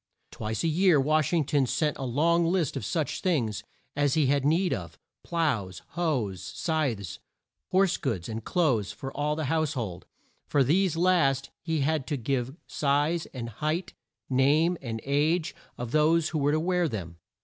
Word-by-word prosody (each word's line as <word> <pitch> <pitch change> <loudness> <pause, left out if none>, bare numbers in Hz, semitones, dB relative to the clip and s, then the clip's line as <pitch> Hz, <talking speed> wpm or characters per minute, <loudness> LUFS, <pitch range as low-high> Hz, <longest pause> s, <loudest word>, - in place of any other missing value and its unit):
Twice 110 0 -3
a - - +2
year 170 0 +4
Wash 155 +1 +2
ing 165 -4 +2
ton 140 -2 +2
sent 150 +3 0
on - - -5
a 125 - -3
long 170 +6 +3
list 170 -3 +1
of - - -3
such 150 - -2
things 125 - 0 0.3
as 145 -2 +2
he 155 -2 +3
had 140 +1 +2
need 170 +5 +2
of: - - -6 0.3
ploughs, 130 - -1
hoes, 135 - -1
scythes, 140 - -2 0.5
horse 190 -1 +3
goods, 100 -11 -2
and 110 0 -5
clothes 125 - +1
for 135 -1 -7
all 150 +1 0
the 155 -1 -2
house 155 +1 0
hold. 100 - -5 0.4
For 140 - +3
these 165 +5 +2
last 155 -7 +2
he 160 -3 -1
had 145 -2 0
to 145 - -1
give 130 +1 -2
size 150 +4 0
and 120 -3 -6
height, 155 - -3 0.3
name, 145 +7 +3
and 115 -3 -4
age, 155 +4 +1 0.2
of 120 -1 -5
those 155 +2 +3
who 155 - -2
were 145 +1 +2
to 155 - +2
wear 175 0 +1
them. 85 -8 -6
145 Hz, 175 wpm, -27 LUFS, 130-165 Hz, 0.5 s, year